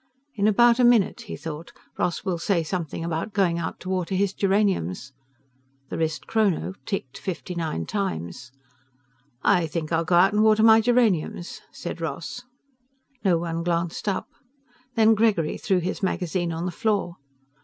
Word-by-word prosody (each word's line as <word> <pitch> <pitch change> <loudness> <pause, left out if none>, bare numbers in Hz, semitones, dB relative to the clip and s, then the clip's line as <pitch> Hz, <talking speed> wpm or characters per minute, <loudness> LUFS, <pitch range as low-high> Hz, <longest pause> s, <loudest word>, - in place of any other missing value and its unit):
"In 210 -3 +1
about 235 +3 +5
a - - +5
minute," 240 -1 +4
he - - -4
thought, 160 +1 -7 0.2
"Ross 175 - -2
will 180 -3 -1
say 170 -1 +1
something 165 -1 -4
about 170 +5 -3
going 180 -5 +2
out 160 - -4
to 185 - -6
water 185 0 -1
his 195 0 +1
geraniums." 190 - 0 0.8
The - - -4
wristchrono 185 +4 0
ticked 140 - -4
fifty 185 -1 -5
nine 160 - -3
times. 120 - -4 0.9
"I 175 -4 +3
think 155 0 -4
I'll 165 0 +2
go 175 +2 +1
out 190 +3 +5
and 210 - +3
water 220 0 +5
my 225 0 +7
geraniums," 215 -8 +1
said - - -6
Ross. 245 - -4 0.8
No 185 -4 +3
one 165 0 -3
glanced 170 +2 -2
up. 195 - -1 0.7
Then 225 -1 +5
Gregory 210 -8 +1
threw 190 -3 +1
his 180 +4 -2
magazine 180 -2 -1
on 165 +1 -3
the 180 - -2
floor. 195 -2 -1
180 Hz, 155 wpm, -25 LUFS, 165-210 Hz, 0.9 s, my